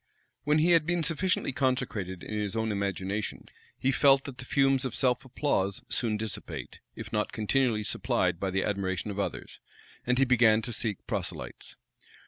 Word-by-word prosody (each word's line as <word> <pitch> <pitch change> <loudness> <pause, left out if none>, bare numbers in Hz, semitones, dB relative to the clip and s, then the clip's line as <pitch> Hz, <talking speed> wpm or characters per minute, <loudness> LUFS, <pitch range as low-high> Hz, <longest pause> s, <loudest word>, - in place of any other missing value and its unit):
When 150 +1 +3
he 165 +3 +4
had 165 -2 +4
been 175 -1 +1
sufficiently 180 +1 +1
consecrated 125 - -1
in - - -6
his 105 0 -2
own 110 -1 0
imagination, 100 +1 -2 0.3
he 135 - +1
felt 135 0 +5
that 135 -3 -9
the 125 - -6
fumes 135 -1 +3
of 130 -3 -3
self 125 +1 +2
applause 120 -7 -1
soon 110 -3 0
dissipate, 110 -3 -6 0.2
if - - -8
not 105 0 0
continually 110 0 +1
supplied 85 - 0
by 95 - -1
the 95 +1 0
admiration 100 0 -2
of 100 - -5
others; - - -4 0.4
and 125 0 +1
he 135 - +4
began 115 -3 +4
to 120 - -3
seek 110 -3 -3
proselytes. - - -5
120 Hz, 170 wpm, -29 LUFS, 105-135 Hz, 0.4 s, felt